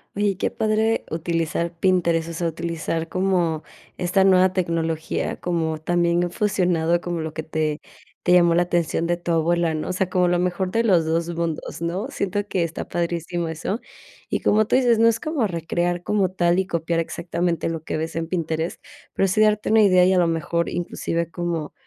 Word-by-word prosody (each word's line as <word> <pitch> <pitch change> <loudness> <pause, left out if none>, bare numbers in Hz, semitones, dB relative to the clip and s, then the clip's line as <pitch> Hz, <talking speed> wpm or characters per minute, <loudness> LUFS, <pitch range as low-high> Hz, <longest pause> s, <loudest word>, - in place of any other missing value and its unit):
Oye, 200 -1 +1
qué - - -1
padre 220 0 +1
utilizar 165 +1 -1
Pinterest, 170 -3 +2
o 170 - -6
sea, 170 +1 -1
utilizar 165 0 -3
como 175 -4 0 0.3
esta 180 +2 +2
nueva 185 -1 +5
tecnología, 165 -3 -2
como 165 -3 -1
también 175 +1 +1
fusionado 175 -4 +1
como 175 -2 -3
lo 160 0 -5
que 160 - -4
te 155 -1 -2 0.4
te 180 - +3
llamó 175 -1 +5
la 175 - +3
atención 170 -1 0
de 175 - +1
tu 175 0 -4
abuela, 165 0 +2
¿no? 155 - -3
O 185 - -2
sea, 185 0 0
como 180 -1 +2
lo 175 0 +2
mejor 180 +1 -1
de 230 +4 +1
los 180 -7 +3
2 165 +1 0
mundos, 165 -1 -3
¿no? 180 +8 -2
Siento 205 -4 -2
que 185 - -1
está 165 -1 -4
padrísimo 170 0 -2
eso. 180 +8 -3 0.5
Y - - -1
como 215 0 +3
tú - - +2
dices: 245 -3 +4
"No 230 - +6
es 230 -1 +2
como 300 -9 -1
recrear 175 +1 -2
como 200 -2 +1
tal 175 -1 +2
y 190 - -1
copiar 165 -1 -1
exactamente 170 +1 -2
lo 165 -1 -4
que - - -4
ves 160 +1 -4
en 165 - -2
Pinterest, 165 -1 -3 0.3
pero 195 - +2
sí 205 - 0
darte 210 -1 +3
una 220 0 +6
idea". 185 -3 +5
Y, 185 - +4
a 185 - +3
lo 175 - +3
mejor, 165 +1 -1
inclusive, 170 -1 -3
como 170 -3 -3
175 Hz, 195 wpm, -23 LUFS, 165-185 Hz, 0.5 s, No